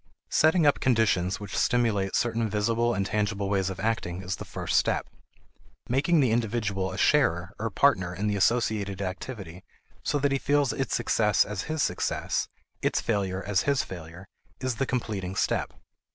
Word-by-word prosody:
Setting 160 +1 +4
up 145 - +4
conditions 105 -7 +2
which 105 -2 -7
stimulate 110 -6 +1
certain 115 -1 0
visible 115 +3 +1
and 95 0 0
tangible 100 -1 -1
ways 95 -1 +1
of 95 - -6
acting 95 -5 -2
is 95 +1 -3
the - - -7
first - - -3
step. - - 0 0.8
Making 145 +6 +3
the 125 -4 +2
individual 105 -5 -1
a 95 - -6
sharer 105 - +2
or 115 +1 -1
partner 95 -6 +2
in 95 +4 -3
the 105 -1 +1
associated 105 -2 +1
activity 95 -2 -6 0.4
so - - 0
that 145 0 +1
he 135 - +1
feels 145 -2 +2
its 135 - -1
success 110 -3 +2
as 105 -2 -4
his 155 -1 0
success, - - -1 0.3
its - - +1
failure 95 -4 -1
as 100 -2 +1
his 140 -1 +2
failure, 85 0 -9 0.3
is 130 -3 -2
the 135 - 0
completing 100 -7 -3
step. - - 0
105 Hz, 165 wpm, -27 LUFS, 95-120 Hz, 0.8 s, Setting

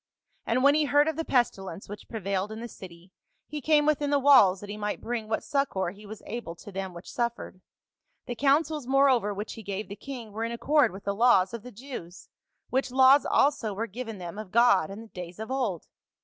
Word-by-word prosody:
And 255 +3 +1
when 280 +1 +6
he 305 0 +2
heard 290 +1 +4
of 320 - 0
the 325 - -2
pestilence 195 - -1
which 205 +1 -10
prevailed 200 -2 -2
in 220 - -6
the 235 - -6
city, 180 -4 -13 0.3
he 300 0 -6
came 300 0 +3
within 295 -1 +1
the 290 - +3
walls 260 -10 +6
that 205 - -10
he - - -5
might 210 0 -3
bring 230 -2 -4
what 220 - -2
succor 275 - -1
he 205 +2 -14
was 215 +1 -10
able 225 -7 -6
to 205 - -12
them 190 -1 -5
which 170 - -10
suffered. 235 -7 -3 0.6
The 245 - -4
counsels 285 +2 +1
more 275 +1 +4
over 225 -5 +1
which 205 +2 -5
he 225 - -9
gave 200 0 -5
the 200 - -6
king 245 -3 -8
were 220 +2 -4
in 230 - -2
accord 275 +1 +2
with 195 +2 -10
the 200 - -1
laws 200 -3 +4
of 235 - -5
the 250 +3 -11
Jews, 210 -7 -9 0.4
which 265 +1 0
laws 265 +2 +5
also 230 -8 +2
were 225 +3 -2
given 225 0 -7
them 180 +2 -7
of 215 -3 -7
God 235 -8 +4
in 210 +3 -8
days 180 -2 -8
of 220 +3 -6
old. 240 -11 -2
225 Hz, 220 wpm, -27 LUFS, 200-270 Hz, 0.6 s, when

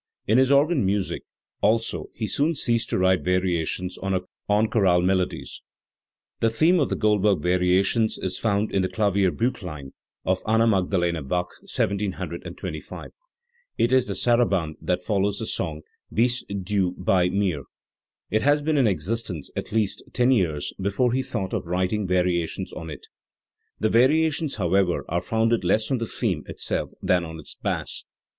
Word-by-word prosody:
In 110 +4 +4
his 130 +1 +4
organ 140 -1 +4
music 100 0 -1 0.4
also 115 +2 +1
he 110 - -2
soon 145 - +1
ceased 115 -4 0
to - - 0
write 95 0 +3
variations 90 0 -1
on 95 -1 0 0.5
chorale 95 -6 +3
melodies. 95 0 -1 0.8
The 115 - +3
theme 160 +10 +3
of 140 - +1
the - - 0
Goldberg 105 -5 +2
variations 90 +5 +2
is 95 -1 -3
found 105 -1 0
in 95 - +1
the 95 - 0
KlavierbJlchkin 100 - -1 0.3
of 95 0 +1
Anna 110 +1 +4
Magdalena 90 -5 +1
Bach 90 +6 -2
(1723). 95 -4 -4 0.7
It 120 - +2
is 130 -1 +3
the - - -3
Sarabande 100 -10 +1
that 90 0 -1
follows 100 +1 0
the 110 - -3
song 80 -7 -3 0.3
u - - -14
Bist 120 +2 +2 0.2
du 95 -2 0
bei 90 0 +2
mir". 90 -8 -1 0.7
It 110 - +2
had 145 +1 +2
been 155 -1 +2
in 130 -4 +4
existence 95 -2 -2
at - - -4
least 110 -2 0
ten 125 +1 +3
years 85 - 0
before 100 +6 +1
he 130 - +1
thought 100 -8 -4
of - - -2
writing 95 +3 0
variations 90 -2 0
on 80 - -7
it, 75 - -9 0.7
The 110 - +2
variations, 150 +5 +3
however, 95 -1 +1
are 85 +1 -1
founded 115 -1 +1
less 105 +7 +1
on 130 - +1
the 115 - -2
theme 95 -11 -1
itself - - -2
than 90 -1 +2
on 80 -1 -7
its - - -8
bass. - - -3
100 Hz, 155 wpm, -24 LUFS, 90-115 Hz, 0.8 s, In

